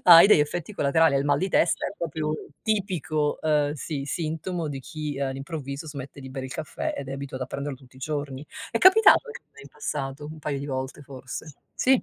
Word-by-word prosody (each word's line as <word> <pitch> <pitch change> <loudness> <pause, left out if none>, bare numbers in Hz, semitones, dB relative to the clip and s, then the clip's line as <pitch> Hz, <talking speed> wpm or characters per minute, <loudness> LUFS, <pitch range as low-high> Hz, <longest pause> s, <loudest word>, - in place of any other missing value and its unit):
hai 170 0 +11
degli 190 - +8
effetti 165 +6 -1
collaterali, 160 -3 +3
hai 135 - +3
il 140 - -1
mal 145 -1 +3
di 190 - 0
testa, 175 - +2
è - - -3
proprio 155 -2 -2 0.3
tipico, 180 -8 0
ehm, 150 -2 +2
sì 145 -1 -4
sintomo 160 +3 -2
di 140 -2 -4
chi 150 0 -5
all'improvviso 140 +2 -4
smette 140 -1 -8
di 130 - -8
bere 130 0 -4
il 130 - -7
caffè, 155 -2 -3
ed 140 -1 -5
è - - -4
abituato 135 -1 -5
a - - -3
prenderlo 140 +1 -4
tutti 130 0 -19
i - - -13
giorni. 145 0 -4 0.2
È 230 - +1
capitato 415 +5 +7
anche 465 0 -8
a - - -49
me 140 - -13
in 140 - -12
passato 145 0 -4
un - - -11
paio 145 -2 -2
di 140 - -5
volte 130 0 -4
forse. 135 +2 -8 0.2
Sì. 260 0 +4
145 Hz, 220 wpm, -26 LUFS, 135-160 Hz, 0.3 s, hai